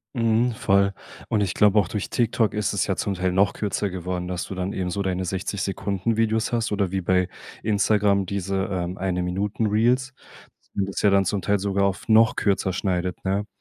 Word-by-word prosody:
Mhm, 115 +1 +2
voll. 100 -2 +2 0.3
Und 110 - +1
ich 95 -3 0
glaube, 105 0 +4
auch 95 - +1
durch 105 +1 -4
TikTok 115 -2 +1
ist 105 0 -1
es 100 - 0
ja 95 - 0
zum 100 +3 -2
Teil 90 0 -1
noch 95 +2 +3
kürzer 105 -1 -2
geworden, 90 -1 -4
dass 90 -1 -3
du 95 - -7
dann 90 +1 -2
eben 90 -1 -2
so 100 +3 -2
deine 95 -1 -1
60-Sekunden-Videos 100 +4 -1
hast 115 -2 0
oder 100 -3 0
wie 95 0 -1
bei 90 0 +2 0.4
Instagram 100 -1 +2
diese, 100 0 -3 0.2
ähm, 90 0 -3
Eine-Minuten-Reels, 105 +8 0 0.6
und 100 -1 0
das 100 - -3
ja 105 - +5
dann 100 0 +3
zum 100 +2 -1
Teil 100 +1 +1
sogar 100 0 +1
auf 100 -1 -2
noch 110 0 +5
kürzer 95 -2 +1
schneidet, 90 -2 -2
ne? 100 +2 0
100 Hz, 190 wpm, -24 LUFS, 95-105 Hz, 0.6 s, ja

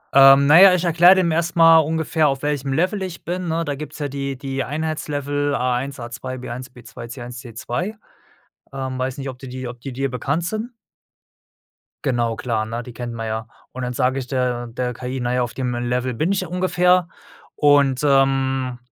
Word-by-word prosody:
Ähm, 135 0 +8
na 160 +6 +7
ja, 195 -2 +9
ich 180 - -1
erkläre 175 +3 +6
dem 175 -3 +2
erst 170 +2 -1
mal 165 -1 +7
ungefähr, 160 0 +1
auf 135 0 -2
welchem 145 -2 -1
Level 185 +8 0
ich 185 -2 -6
bin, 180 +1 -3
ne? 165 0 -1
Da 145 - -2
gibt's 150 +1 -8
ja 145 -2 -3
die 140 -1 -4
die 135 -1 -3
Einheitslevel 145 -1 -2
A1, 130 +2 -1
A2, 120 +2 -6
B1, 125 +1 -7
B2, 120 -1 -11
C1, 120 -1 -8
C2. 130 - -4 0.8
Ähm, 130 -1 -4
weiß 130 +1 -3
nicht, 135 0 -5
ob 125 -1 -9
die 135 - -9
dir 130 -1 -6
ob 120 -1 -11
die 135 - -6
dir 135 +2 -2
bekannt 140 +7 -2
sind. 215 +5 -3 1.4
Genau, 120 -3 0
klar, 110 -3 -2
ne, 115 +2 -5
die 125 - -10
kennt 120 -1 -6
man 115 -1 -5
ja. 110 0 -4 0.2
Und 130 - -7
dann 125 0 -3
sage 130 +1 +1
ich 130 - -6
der 125 -2 -1
der 125 +1 -3
KI: 125 +2 -5
„Na 120 0 -1
ja, 125 - +1
auf 120 -1 -3
dem 125 -2 -2
Level 125 +1 -1
bin 155 +11 0
ich 190 - 0
ja 185 - -5
ungefähr 180 -1 +2 0.5
und, 145 -3 +4
ähm, 135 -2 +2
135 Hz, 200 wpm, -21 LUFS, 125-155 Hz, 1.4 s, ja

